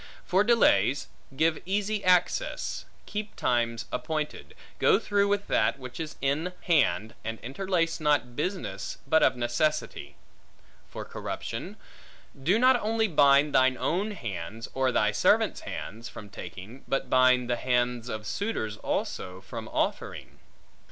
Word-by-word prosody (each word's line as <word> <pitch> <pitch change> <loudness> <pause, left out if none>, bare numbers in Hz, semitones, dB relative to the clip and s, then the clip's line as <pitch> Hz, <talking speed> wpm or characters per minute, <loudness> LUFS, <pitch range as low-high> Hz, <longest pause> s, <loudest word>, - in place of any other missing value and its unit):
For 190 +3 +3
delays: 140 - +3 0.3
give 160 +1 +2
easy 205 +2 -1
access; 180 - +1 0.2
keep 210 0 -5
times 115 -1 0
appointed; 155 -1 -4 0.2
go - - +5
through 200 -1 +1
with 200 0 0
that 110 - +2
which 130 0 -9
is 160 -2 -5
in 150 +6 0
hand, 110 - +2
and 115 0 -4
interlace 165 +5 -1
not 145 -6 +1
business, 150 - -3
but 160 +3 +4
of - - +4
necessity. 125 +6 -1 0.7
For - - -7
corruption: - - -6 0.6
do 175 +10 +3
not 255 +1 +5
only 220 +1 +1
bind 145 -3 +4
thine 130 0 +4
own 190 +6 0
hands, 110 - -6
or 130 -1 +1
thy 105 -3 +2
servants' - - +2
hands, 115 +4 -6
from 105 -4 -10
taking, 100 +5 -9
but 135 - -1
bind 130 -1 +4
the 120 - +1
hands 125 -1 0
of 110 -2 -5
suitors 110 - -2
also, 95 -3 -3
from - - -7
offering. - - -3
140 Hz, 135 wpm, -28 LUFS, 120-185 Hz, 0.7 s, go